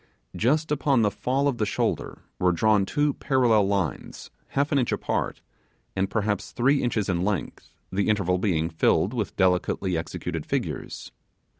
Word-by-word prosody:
Just 150 +7 +1
upon 140 -5 +2
the 105 - +2
fall 130 +7 0
of 135 -4 -1
the 105 - +2
shoulder - - -2 0.2
were 90 -1 +3
drawn 100 +3 +2
two 145 -1 +1
parallel 120 -8 +2
lines 95 -8 -3 0.2
half 140 +2 -1
an 140 - +3
inch 125 - 0
apart, - - -2 0.5
and 95 0 0
perhaps 105 -2 -1
three 135 +3 +2
inches 110 -5 0
in 90 -2 0
length, 100 -4 -3 0.2
the 100 +2 0
interval 95 -4 +1
being 85 -5 +1
filled 95 +6 +2
with 110 -5 -3
delicately 90 0 +1
executed 80 0 -4
figures. - - -4
105 Hz, 155 wpm, -25 LUFS, 95-130 Hz, 0.5 s, were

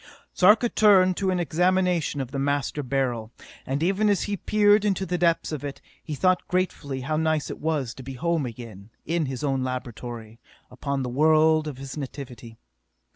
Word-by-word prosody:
Sarka 210 +6 +5
turned 190 -5 +4
to 195 -1 0
an 185 -1 +1
examination 180 -3 +1
of 130 -1 -6
the 135 - -3
Master 145 +1 -1
Beryl, 125 -4 -2 0.4
and 140 +4 -1
even 195 +4 +2
as 200 - +2
he 205 - -2
peered 205 +1 +3
into 195 -2 0
the 180 0 -2
depths 170 -1 +1
of 150 -2 -4
it, 140 -1 -6 0.2
he 155 - -5
thought 185 +4 +1
gratefully 155 -7 -2
how 155 +4 -2
nice 155 -1 0
it - - -8
was 145 -6 -1
to - - -11
be 135 +1 -7
home 165 0 -1
again, 110 -4 -10 0.2
in 165 -2 0
his 130 0 -5
own 135 -2 0
laboratory, 120 -3 -6 0.3
upon 135 +2 -3
the 125 - -3
world 155 +3 +3
of 145 -4 -6
his 135 +2 -8
nativity. 125 -5 -8
150 Hz, 180 wpm, -25 LUFS, 130-180 Hz, 0.4 s, Sarka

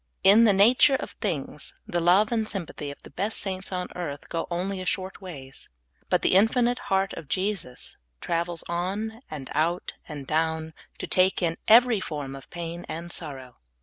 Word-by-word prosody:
In 205 +4 +8
the 215 - +6
nature 235 +8 +6
of - - -4
things, 155 - -3
the 175 - -1
love 185 +6 +4
and 220 -2 0
S3anpathy 165 -8 -5
of 140 - -11
the - - -13
best 205 +4 -1
saints 190 -1 -3
on 180 -1 -2
earth 145 -5 -5
go 165 - -2
only 185 +2 -2
a - - -5
short 190 +2 -2
ways; 140 -8 -10 0.4
but - - +2
the - - +3
infinite 240 +5 +4
heart 195 0 +2
of 165 - -8
Jesus 185 -6 -2 0.2
travels 170 0 -1
on 200 +7 -3
/and 140 -4 -6
out 165 +4 0 0.2
and 145 -3 -6
down 160 +1 0 0.2
to - - -4
take 185 0 +3
in 165 -1 +1
every 235 0 +7
form 145 -6 -5
of 135 - -12
pain 170 0 -6
and 170 +2 -5
sorrow. 130 -6 -6
175 Hz, 180 wpm, -26 LUFS, 160-200 Hz, 0.4 s, In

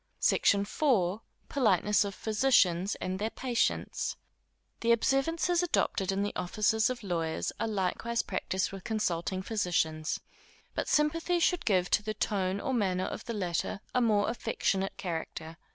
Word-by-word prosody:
SECTION 200 - +3
IV. 200 - +1 0.3
Politeness 210 -6 +3
of 200 0 -5
Physicians 205 -5 +2
and 185 +1 -4
their 215 +2 -1
Patients. 245 0 -1 0.6
The 235 - +2
observances 325 +8 +1
adopted 200 - +1
in 195 +1 0
the 205 - -3
offices 215 +5 +1
of 250 -2 -4
lawyers, 165 -4 -2
are 225 - 0
likewise 220 +3 -1
practised 190 0 -2
with 195 -1 -8
consulting 185 -5 -1
physicians; 170 -7 0 0.5
but - - -2
sympathy 330 +4 +2
should 355 +1 +1
give 185 -4 +2
to - - +4
the 215 +1 -4
tone 195 -1 0
or 265 - -2
manner 185 -6 +1
of - - -6
the 230 - -4
latter 180 -1 -2
a 250 - +3
more 210 -3 +3
affectionate 195 -4 -1
character. 165 -2 -5
205 Hz, 145 wpm, -30 LUFS, 185-235 Hz, 0.6 s, to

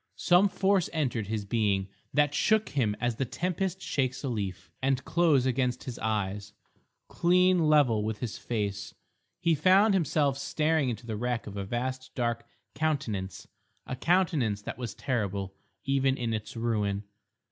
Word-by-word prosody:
Some 180 +3 +4
force 190 -2 +2
entered 125 -9 -1
his 105 -1 -3
being 100 -3 +1 0.2
that 145 -1 +2
shook 220 +7 +2
him 115 -7 0
as 120 -2 -1
the - - 0
tempest 185 +7 -2
shakes 130 -6 -1
a 135 - -1
leaf, 100 -6 -4
and 135 0 0
close 155 -7 +3
against 125 -1 0
his 125 -3 -6
eyes—clean 110 - 0
level 130 -8 +4
with 110 0 -2
his 115 -2 -4
face—he 105 - -3
found 190 +7 +5
himself 145 -6 +1
staring 155 -1 +1
into 115 0 -5
the 110 -2 -4
wreck 120 +1 -2
of 105 - -8
a 100 -1 -3
vast 130 +4 -4
dark 120 -1 -1 0.3
Countenance, 135 - -2 0.4
a - - -4
countenance 150 - +1
that 115 - -6
was 120 -3 -5
terrible 100 -6 -2 0.3
even 135 -1 +2
in 115 -2 -2
its 110 +1 -5
ruin. 105 -3 -1
125 Hz, 145 wpm, -29 LUFS, 110-155 Hz, 0.4 s, found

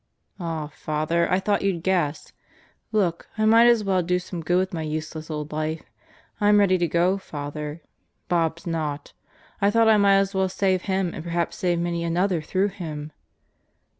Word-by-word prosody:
"Aw, 165 -3 -3
Father, 155 +3 -1
I 185 - +3
thought 205 +1 0
you'd 190 -4 -1
guess. 170 -6 -1 0.6
Look, 190 -6 0
I 215 - +2
might 230 +2 +6
as 235 -3 +4
well 190 -2 +2
do 180 +1 +1
some 180 -1 -6
good 175 +3 +1
with 185 0 0
my 165 - -3
useless 155 0 -5
old 150 -1 -4
life. 155 +1 -3 0.6
I'm 210 0 +5
ready 190 -3 +4
to 175 - +1
go, 180 +4 +2
Father. 150 -1 -6 0.4
Bob's 165 -1 0
not. 155 -4 -3 0.5
I 200 - +4
thought 225 +1 +4
I 220 - +6
might 200 -1 +5
as 195 0 +1
well 190 -1 +1
save 190 -1 +1
him 190 -2 0
and 155 - -6
perhaps 170 0 -2
save 175 -2 +1
many 170 0 -1
another 175 +1 +1
through 190 +6 0
him." 155 -5 -7
175 Hz, 175 wpm, -24 LUFS, 160-195 Hz, 0.6 s, might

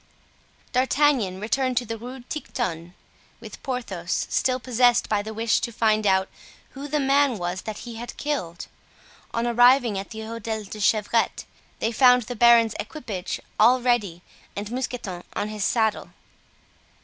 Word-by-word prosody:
D'Artagnan 255 -7 +2
returned 255 +4 -1
to 245 - +1
the 225 0 -4
Rue 250 +3 -9
Tiquetonne 185 - -5 0.4
with - - -11
Porthos, 200 - -3
still 255 0 +1
possessed 245 -1 +3
by 210 -1 +1
the 220 +1 -7
wish 225 +1 +1
to 235 - -3
find 215 -2 +1
out 190 0 +3 0.4
who 280 +1 -7
the 300 +1 0
man 275 -2 +3
was 175 0 -3
that 215 +2 -7
he 235 -2 -8
had 240 +1 -8
killed. 225 - -3 0.7
On 230 0 -1
arriving 240 -2 +4
at 195 - -7
the 220 -1 -7
Hotel 220 -1 -5
de 195 - -15
la 210 - -7
Chevrette 215 +3 +1 0.3
they 225 - -1
found 250 +1 +5
the 245 +3 -6
baron's 235 -1 +5
equipage 210 - -5 0.2
all 240 +4 +6
ready 215 -9 0 0.3
and 205 +2 -5
Mousqueton 240 -8 -4
on 210 - -2
his 215 -2 -4
saddle. 220 -2 0
230 Hz, 155 wpm, -24 LUFS, 210-250 Hz, 0.7 s, all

